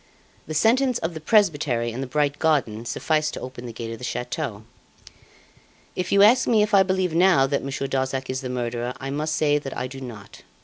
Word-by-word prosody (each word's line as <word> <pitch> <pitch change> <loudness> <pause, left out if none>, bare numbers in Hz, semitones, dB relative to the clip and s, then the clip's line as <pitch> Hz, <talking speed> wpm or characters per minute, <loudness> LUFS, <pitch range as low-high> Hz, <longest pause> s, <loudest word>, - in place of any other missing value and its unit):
The 155 - -5
sentence 245 - +3
of 165 -4 -3
the 160 - -6
presbytery 150 - +2
and 120 +4 -5
the 135 - -4
bright 145 +2 0
garden 130 -9 +1
sufficed 155 +4 -1
to - - -5
open 125 -1 -8
the - - -6
gate 115 0 -6
of 115 - -9
the - - -11
chateau. 125 -2 -4 1.3
If 180 - -3
you 200 0 +6
ask 245 +5 +5
me 220 -3 +4
if 210 0 -3
I 195 - +7
believe 185 -2 0
now 175 -5 +5
that 140 +1 -1
Monsieur 135 0 -3
Darzac 130 -1 -2
is 130 0 -3
the 130 - -5
murderer, 120 0 -3
I 135 0 -5
must 155 +2 -2
say 150 -1 +2
I 125 - -3
do 135 +1 -8
not. 110 -6 -10
140 Hz, 210 wpm, -24 LUFS, 125-165 Hz, 1.3 s, I